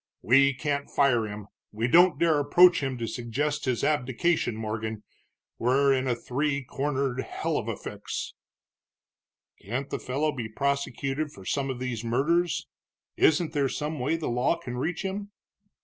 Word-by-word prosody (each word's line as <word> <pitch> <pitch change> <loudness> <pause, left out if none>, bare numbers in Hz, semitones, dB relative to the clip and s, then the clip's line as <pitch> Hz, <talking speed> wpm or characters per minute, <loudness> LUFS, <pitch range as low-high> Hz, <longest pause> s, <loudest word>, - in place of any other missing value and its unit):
We 135 +3 +5
can't 140 0 -2
fire 120 -6 +2
him, 105 -1 -7 0.3
we 110 +3 -1
don't 175 +6 +6
dare 170 -1 +3
to 150 - +2
approach 175 +5 +6
him 135 -2 -2
to 115 -1 -3
suggest 135 +7 -2
his 125 -4 0
abdication. 140 -1 +1
Morgan, 110 0 -4 0.6
we're 135 +3 +3
in 130 0 0
a 120 - +1
three 140 +4 -1
cornered 135 -1 -2
hell - - -3
of - - -2
a - - -3
fix!" - - -6 1.3
"Can't 125 +7 -4
the - - -2
fellow 145 +4 -1
be 120 -6 -5
prosecuted 140 +3 -2
for 95 -7 -13
some 140 +4 -1
of 130 - -3
these 125 -3 -4
murders? 155 +9 +1 0.5
Isn't 160 +1 +3
there 140 -3 +1
some 150 +2 -3
way 145 +6 +1
the 165 - -4
law 125 +7 +1
can 130 -8 -7
reach 165 +9 -2
him?" 200 +1 -4
135 Hz, 165 wpm, -27 LUFS, 120-150 Hz, 1.3 s, don't